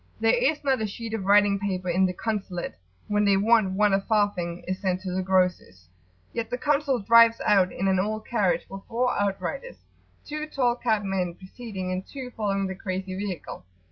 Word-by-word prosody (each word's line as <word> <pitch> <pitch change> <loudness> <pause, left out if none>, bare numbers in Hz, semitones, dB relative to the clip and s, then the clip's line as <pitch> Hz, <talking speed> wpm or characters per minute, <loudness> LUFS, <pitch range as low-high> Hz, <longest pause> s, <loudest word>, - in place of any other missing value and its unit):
There 225 0 +3
is 275 +6 +1
not 265 -4 +1
a 215 - 0
sheet 225 +2 -7
of 210 -4 -3
writing 200 0 +4
paper 185 -2 -3
in 185 +2 +3
the 180 - -3
"Consulate" 195 -4 -3 0.3
when 210 0 +1
they 200 -1 +4
want 215 -2 +3
one 205 +1 +3
a 195 - +3
farthing 195 -5 0
is 185 0 -2
sent 185 -1 -1
to 185 -2 -4
the 185 +1 -1
grocer's 180 - 0 0.5
yet 230 -1 -3
the 245 - -2
Consul 285 -1 +1
drives 230 +1 +5
out 195 -3 +4
in 195 - -2
an 190 -1 +2
old 215 +2 -2
carriage 205 -6 0
with 195 0 -9
four 250 +2 0
outriders, 205 - -3 0.5
two 305 +1 -5
tall 250 -5 +1
capped 220 -4 0
men 185 -3 -2
preceding 190 -1 -7
and 185 +1 -2
two 260 +1 -8
following 200 -3 -1
the 190 - -3
crazy 185 -1 -4
vehicle. 190 - -5
200 Hz, 195 wpm, -26 LUFS, 185-230 Hz, 0.5 s, drives